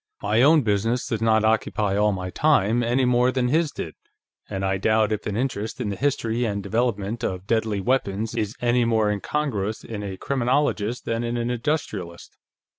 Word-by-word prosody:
"My 115 Hz, -, +2 dB
own 150 Hz, +2 st, +6 dB
business 115 Hz, +3 st, 0 dB
does 115 Hz, -1 st, -3 dB
not 110 Hz, -1 st, +3 dB
occupy 110 Hz, -2 st, +1 dB
all 105 Hz, +1 st, +3 dB
my 90 Hz, -2 st, -4 dB
time, 120 Hz, -6 st, +2 dB
any 120 Hz, +2 st, +1 dB
more 125 Hz, 0 st, +3 dB
than 125 Hz, -1 st, 0 dB
his 160 Hz, +2 st, +2 dB
did, -, -, -6 dB, 0.6 s
and 95 Hz, -1 st, -3 dB
I 95 Hz, 0 st, 0 dB
doubt 110 Hz, +1 st, +2 dB
if 105 Hz, -1 st, -2 dB
an 105 Hz, 0 st, -2 dB
interest 120 Hz, -1 st, -3 dB
in 115 Hz, -5 st, -2 dB
the 100 Hz, -, -3 dB
history 120 Hz, -3 st, 0 dB
and 100 Hz, -3 st, -2 dB
development 110 Hz, +1 st, -1 dB
of 90 Hz, -2 st, -3 dB
deadly 110 Hz, -2 st, 0 dB
weapons 110 Hz, -2 st, 0 dB
is 105 Hz, +2 st, -2 dB
any 120 Hz, 0 st, +3 dB
more 110 Hz, -2 st, +2 dB
incongruous 110 Hz, -2 st, -2 dB
in 110 Hz, -2 st, -6 dB
a 95 Hz, -2 st, -5 dB
criminologist 125 Hz, -3 st, 0 dB
than 115 Hz, +1 st, -1 dB
in 120 Hz, 0 st, -2 dB
an 120 Hz, +1 st, -1 dB
industrialist. 115 Hz, -, -3 dB
110 Hz, 185 wpm, -24 LUFS, 105-125 Hz, 0.6 s, own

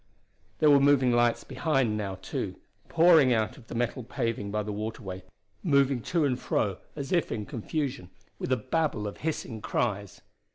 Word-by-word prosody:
There 150 Hz, -1 st, +5 dB
were 140 Hz, -, +7 dB
moving 135 Hz, -2 st, +4 dB
lights 120 Hz, 0 st, +2 dB
behind 135 Hz, -9 st, 0 dB
now, 100 Hz, -3 st, -3 dB
too, 95 Hz, -, -4 dB, 0.3 s
pouring 165 Hz, -5 st, +6 dB
out 110 Hz, -2 st, +1 dB
onto 140 Hz, -, -15 dB
the 115 Hz, -, -9 dB
metal 120 Hz, +2 st, -1 dB
paving 115 Hz, -4 st, -2 dB
by 105 Hz, +1 st, -1 dB
the 105 Hz, -, -4 dB
waterway, 105 Hz, -3 st, -5 dB, 0.4 s
moving 140 Hz, -4 st, +3 dB
to 165 Hz, +5 st, +1 dB
and 130 Hz, -3 st, 0 dB
fro 100 Hz, -3 st, -1 dB, 0.2 s
as 140 Hz, -2 st, -5 dB
though 175 Hz, -, +5 dB
in 105 Hz, -2 st, -3 dB
confusion, 135 Hz, -, -4 dB, 0.3 s
with -, -, -3 dB
a 130 Hz, -, +4 dB
babel 135 Hz, -6 st, -1 dB
of 105 Hz, -, -5 dB
hissing 135 Hz, -8 st, -4 dB
cries. 100 Hz, -5 st, -2 dB
120 Hz, 170 wpm, -28 LUFS, 105-140 Hz, 0.4 s, were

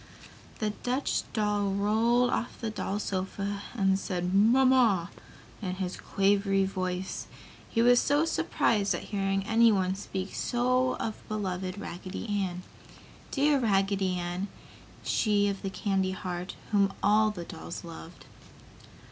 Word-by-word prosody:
The 215 Hz, -1 st, -1 dB
Dutch 255 Hz, +3 st, -1 dB
doll 210 Hz, -2 st, +1 dB
rolled 230 Hz, +5 st, +2 dB
off 240 Hz, -, -2 dB
the 225 Hz, -2 st, -3 dB
doll 205 Hz, -1 st, -3 dB
sofa 200 Hz, 0 st, -3 dB
and 195 Hz, -3 st, +2 dB
said 180 Hz, -1 st, -2 dB
"Mamma" 230 Hz, -3 st, +4 dB, 0.5 s
in 185 Hz, -3 st, -3 dB
his 185 Hz, -1 st, -3 dB
quavery 195 Hz, 0 st, +2 dB
voice, 185 Hz, -1 st, -3 dB, 0.4 s
he 230 Hz, -, +2 dB
was 245 Hz, 0 st, +6 dB
so 290 Hz, +3 st, +2 dB
surprised 210 Hz, -9 st, +1 dB
at -, -, -5 dB
hearing 195 Hz, -1 st, 0 dB
anyone 220 Hz, -4 st, +4 dB
speak 190 Hz, 0 st, -5 dB
so 255 Hz, +1 st, +1 dB
of 220 Hz, -, -4 dB
beloved 190 Hz, -3 st, -3 dB
Raggedy 185 Hz, +2 st, -6 dB, 0.2 s
Ann 180 Hz, -1 st, -4 dB, 0.7 s
dear 285 Hz, 0 st, +3 dB
Raggedy 195 Hz, -4 st, +1 dB
Ann, 175 Hz, +2 st, -3 dB, 0.6 s
she 205 Hz, -3 st, +2 dB
of 200 Hz, -1 st, -2 dB
the 195 Hz, -, -3 dB
candy 190 Hz, -1 st, 0 dB
heart, 180 Hz, -1 st, -5 dB, 0.2 s
whom 200 Hz, -2 st, +3 dB
all 215 Hz, +1 st, +5 dB
the 180 Hz, -5 st, -6 dB
dolls 170 Hz, -1 st, -7 dB
loved. 165 Hz, 0 st, -10 dB
200 Hz, 130 wpm, -29 LUFS, 185-220 Hz, 0.7 s, was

